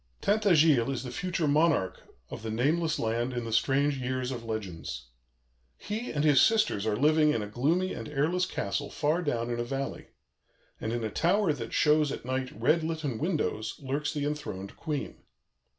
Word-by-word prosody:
"Tintagiles 165 - +4
is 135 -2 -2
the 125 - -6
future 175 +3 -1
monarch 150 - +2 0.3
of - - -6
the 110 - -5
nameless 155 +8 +1
land 115 +3 -1
in 120 -1 -3
the 115 - -4
strange 140 +4 +2
years 130 0 -2
of 120 -3 -5
legends. 95 - -5 0.7
He 220 +4 -4
and 145 -1 -1
his 145 -3 +6
sisters 215 - +3
are 105 - +1
living 150 +5 +4
in 110 - -1
a - - -5
gloomy 155 - 0
and - - -6
airless 160 +6 +1
castle 140 - -3
far 155 +4 0
down 120 -7 -1
in 120 - -2
a - - 0
valley; 135 +3 -4 0.7
and 110 - -3
in 120 0 -2
a 110 - -2
tower 180 - +2
that 115 -5 -6
shows 150 -1 +3
at - - -6
night 130 0 -2
red 155 +8 +3
litten 155 -7 -3
windows 150 - -1
lurks 145 +2 -2
the 145 -1 -2
enthroned 145 -10 -4
Queen. 150 -3 -4
140 Hz, 180 wpm, -29 LUFS, 120-155 Hz, 0.7 s, his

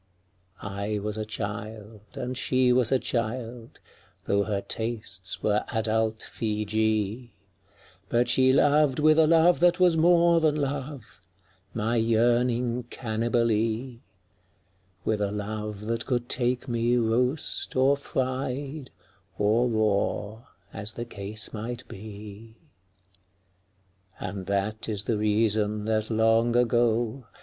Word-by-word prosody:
I 100 +2 -3
was 105 +1 -3
a 110 0 -3
child, 105 0 -6
and 125 -1 -4
she 130 0 +2
was 125 -2 +3
a 135 - +5
child 120 -1 -4 0.2
— - - -33
Tho' 100 0 +1
her 100 -2 -1
tastes 105 -3 -3
were 105 0 +2
adult 110 -1 0
Feejee 110 +1 -1 0.4
— 100 -1 -30
But 120 +1 +2
she 130 0 +4
loved 145 0 +3
with 155 +1 +4
a 160 - +5
love 165 +2 +5
that 175 +1 +4
was 180 -3 +4
more 170 0 +5
than 155 -2 +2
love, 140 -6 -4 0.5
My 115 +1 0
yearning 120 +1 +1
Cannibalee; 115 +1 -1 1.0
With 110 -1 0
a 100 -1 0
love 105 0 -5
that 115 +1 -2
could 120 -2 -1
take 125 +1 0
me 120 0 +1
roast 125 +5 0
or 135 +2 +4
fried 135 +1 -3 0.5
Or 110 +4 +2
raw, 110 +1 -1 0.3
as 105 +1 -4
the 120 - -4
case 105 -1 -4
might 120 +3 -5
be. 105 +2 -10 1.6
And 95 0 -6
that 100 +3 -1
is 105 -1 0
the 110 -1 -1
reason 105 0 +1
that 110 -1 0
long 115 +1 +2
ago. 120 0 +1
115 Hz, 125 wpm, -26 LUFS, 105-125 Hz, 1.6 s, a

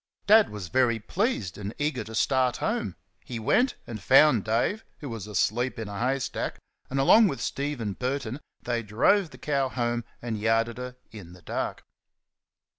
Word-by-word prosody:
Dad 215 +1 +6
was 100 -4 -7
very 125 -3 +3
pleased, 110 - -2
and 105 +2 -5
eager 150 -4 -1
to 110 +1 -8
start 130 +1 +2
home. - - -2 0.3
He 120 - -6
went 220 - +2
and 110 -3 -7
found 130 0 +6
Dave, 120 - 0
who 145 - -7
was 115 -3 -6
asleep 120 +5 0
in 115 -2 -4
a 100 -1 -6
hay 130 +3 +1
stack, 130 - -3 0.3
and 135 - -1
along 215 +11 +7
with 140 - -3
Steven 135 -7 -2
Burton 130 +2 -3 0.2
they 120 -1 -1
drove 125 - +2
the 130 - -13
cow 140 -2 0
home, 120 -1 -1 0.2
and 115 -3 -4
yarded 115 +2 +1
her 125 0 -6 0.2
in 95 -6 -11
the 90 -1 -16
dark. - - -3
120 Hz, 175 wpm, -27 LUFS, 110-140 Hz, 0.3 s, along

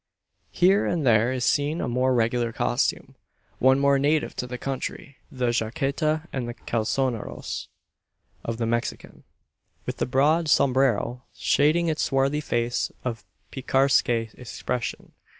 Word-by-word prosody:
Here 190 +3 +3
and 165 -5 -1
there 115 0 +4
is 130 -2 -1
seen 150 +3 +1
a - - -2
more 125 +1 +1
regular 115 0 +1
costume - - -1 0.5
one 130 +1 +5
more 140 0 +3
native 150 +2 +1
to 125 - -3
the 125 0 -5
country 135 +1 -5
the 125 -2 0
jaqueta 140 +7 -1
and 125 -3 -3 0.2
calzoneros 115 +1 -2 0.8
of 115 0 -3
the 115 - -1
Mexican, 120 +1 -3 0.6
with - - -4
the - - -1
broad 150 +6 +2
sombrero 125 -3 +2
shading 155 +4 +2
his 160 -2 -1
swarthy 135 +2 +1
face 120 -4 -1
of 115 -2 -3 0.3
picaresque 135 0 +2
expression. 120 +1 -3
130 Hz, 130 wpm, -25 LUFS, 120-145 Hz, 0.8 s, one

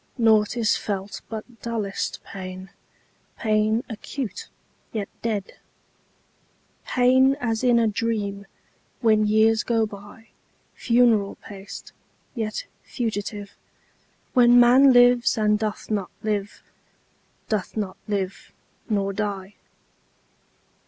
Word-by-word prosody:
Naught 220 -1 +3
is 225 -2 +2
felt 200 -1 -4
but 225 0 -8
dullest 220 -4 -3
pain, 185 0 -8 0.7
Pain 215 +1 +1
acute, 230 -1 -6 0.4
yet 210 -3 -4
dead; 210 -4 -3 1.3
Pain 260 +2 +3
as 225 -2 -1
in 245 -2 +4
a 230 - +3
dream, 205 -2 -2 0.5
When 215 -3 +3
years 220 +1 +4
go 230 -2 +1
byFuneral 215 +1 -1
paced, 200 -1 -10 0.4
yet 220 -3 -3 0.2
fugitive, 205 -3 -4 0.8
When 245 -1 +6
man 255 +3 +7
lives, 245 -1 +5
and 210 -1 +2
doth 215 0 -4
not 200 -4 -1
live, 205 -1 -3 0.8
Doth 215 -1 -2
not 200 -3 -3
live—nor 200 0 -4
die. 200 -1 -4
215 Hz, 95 wpm, -24 LUFS, 200-235 Hz, 1.3 s, man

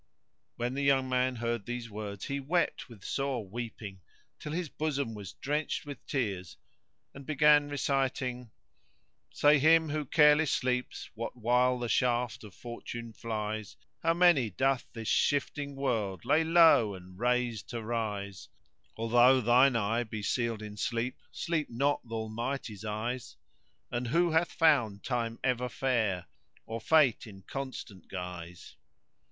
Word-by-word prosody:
When 120 +1 -2
the 140 - -2
young 135 -2 +3
man 125 0 +1
heard 115 -3 -3
these 120 -1 -4
words 100 -2 -6
he 140 0 -2
wept 150 0 -1
with 110 -5 -14
sore 135 -6 -2
weeping;[FN#115] 110 -2 -7 0.4
till 150 - -6
his 170 +1 -2
bosom 140 -5 -2
was 100 -3 -8
drenched 150 +3 -2
with 145 -4 -8
tears 100 - -3 0.6
and 140 - -10
began 150 0 +4
reciting— 135 -3 -1 0.8
Say 145 0 +4
him 160 +2 +5
who 150 0 -2
careless 150 +1 +5
sleeps 125 -1 -2
what 115 +2 -6
while 125 +2 +3
the 120 -1 -3
shaft 120 -1 0
of 105 -3 -12
Fortune 120 -1 -7
flies 110 -2 -4
* - - -50
How 165 0 +2
many 170 -10 +5
cloth 130 +6 0
this 115 -2 -7
shifting 145 0 0
world 115 -8 -2
lay 150 +5 +4
low 160 - +5
and 90 0 -13
raise 125 -2 +1
to 120 -2 -6
rise? 105 -4 -4 0.5
Although 120 +3 +5
thine 125 +2 +5
eye 115 +2 +1
be 110 -2 -6
sealed 115 0 -1
in 105 -1 -8
sleep, 120 +3 -2
sleep 165 -3 -2
not 140 +5 +1
th' - - -7
Almighty's 110 -1 -4
eyes 110 +3 -4 0.3
* - - -43
And 120 0 -2
who 170 +6 +2
hath 160 +2 +2
found 125 -11 +2
Time 115 -2 -2
ever 125 -1 0
fair, 110 -9 0 0.4
or 115 0 -5
Fate 150 -8 +3
in 95 -2 -12
constant 130 -8 -7
guise? 90 -2 -8
120 Hz, 145 wpm, -30 LUFS, 110-140 Hz, 0.8 s, him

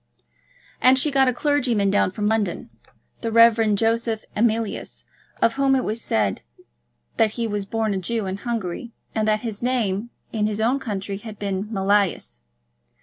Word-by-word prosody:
And 255 +1 +6
she 290 +3 +3
got 270 -1 +4
a - - +4
clergyman 245 -7 +1
down 205 - +3
from 205 +3 -2
London, 210 -5 -1 0.5
the 230 - -2
Rev. 225 -2 +5
Joseph 225 +1 0
Emilius, 225 -1 -1 0.4
of 230 - +4
whom 275 -1 +3
it 260 - +1
was 220 +2 -2
said 105 - 0 0.8
that 220 -1 +3
he 235 - 0
was 205 -2 -2
born 220 0 -1
a 190 - -1
Jew 220 +3 -2
in 190 0 -3
Hungary, 230 0 -4 0.2
and 215 -1 0
that 215 0 +2
his 220 -4 -5
name 235 -4 0 0.2
in 210 -2 +1
his 215 0 -2
own 240 +5 +2
country 200 -5 -4
had 210 0 -9
been 195 -1 -2
Mealyus. 195 - 0
220 Hz, 165 wpm, -23 LUFS, 200-235 Hz, 0.8 s, And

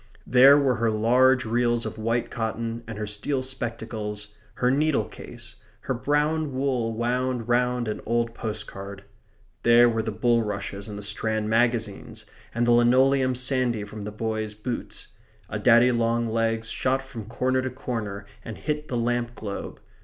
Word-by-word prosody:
There 135 +3 +7
were 135 -4 +2
her 115 0 +1
large 125 +4 +3
reels 120 +1 +1
of 110 0 -6
white 115 +2 -1
cotton 115 0 -3
and 115 -2 -6
her 105 - -3
steel 120 +6 -2
spectacles; 110 -5 -4 0.3
her 125 0 +2
needle 150 +2 +2
case; - - -11 0.2
her - - -2
brown 150 +2 0
wool 130 -4 0
wound 120 +1 -1
round 125 0 +1
an 105 - -3
old 115 0 0
postcard. 100 -3 -6 0.6
There 120 +1 +6
were 115 -1 +1
the 110 - -3
bulrushes 105 -3 -1
and 105 - -6
the 105 - -6
Strand 110 +1 -2
magazines; 115 -3 0 0.3
and 120 +1 0
the 120 - +3
linoleum 130 +2 +4
sandy 125 -3 0
from 105 +1 -8
the 105 +1 -5
boys' 110 0 -3
boots. 115 +3 -5 0.4
A - - -2
daddy 120 +1 +6
long 115 0 +1
legs 115 0 -1
shot 135 +1 0
from 125 -5 -8
corner 130 +3 0
to 130 - -2
corner 110 -6 -5 0.2
and 115 - -7
hit 150 0 -3
the 125 - -2
lamp 120 0 -1
globe. 100 -3 -6
120 Hz, 160 wpm, -25 LUFS, 110-125 Hz, 0.6 s, There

